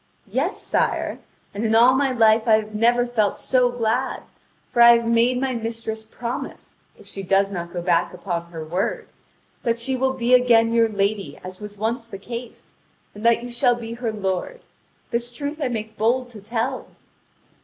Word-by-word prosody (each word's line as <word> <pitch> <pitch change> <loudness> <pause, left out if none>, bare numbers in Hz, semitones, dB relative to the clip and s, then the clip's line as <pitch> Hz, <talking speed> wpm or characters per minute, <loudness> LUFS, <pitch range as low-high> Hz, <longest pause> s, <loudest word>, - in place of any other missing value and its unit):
"Yes, - - -2
sire, - - -1 0.3
and 205 +2 -4
in 225 0 +2
all 240 +3 +7
my 270 0 +2
life 225 -2 +4
I 220 - +5
have 215 0 +1
never 240 +3 +3
felt 220 -4 0
so 250 -1 +2
glad, 245 +2 -1 0.4
for 240 - +1
I 235 0 +9
have 235 - -3
made 235 +2 +3
my 265 0 -1
mistress 225 -1 -4
promise, 235 +2 -6 0.2
if 210 - -17
she 195 0 -7
does 195 +1 +2
not 170 -2 -5
go 175 -1 -4
back 170 -1 +2
upon 175 -2 -4
her 165 -2 -7
word, 180 +5 -2 0.5
that 230 -1 0
she 260 +3 -2
will 265 +1 +1
be 250 -1 0
again 230 -2 +5
your 230 -1 +4
lady 200 -1 -1
as 185 0 -9
was 210 -1 -9
once 230 +3 -2
the 200 - -8
case, 235 +4 -8 0.4
and 210 - -10
that 235 0 +3
you 245 - -7
shall 240 0 +3
be 230 -1 -7
her 235 -1 -3
lord; 205 - -3 0.5
this 240 0 -2
truth 290 +5 -5
I 275 - +1
make 220 -2 -5
bold 245 +3 +1
to 215 -3 -10
tell." 230 +5 -3
230 Hz, 185 wpm, -22 LUFS, 210-245 Hz, 0.5 s, I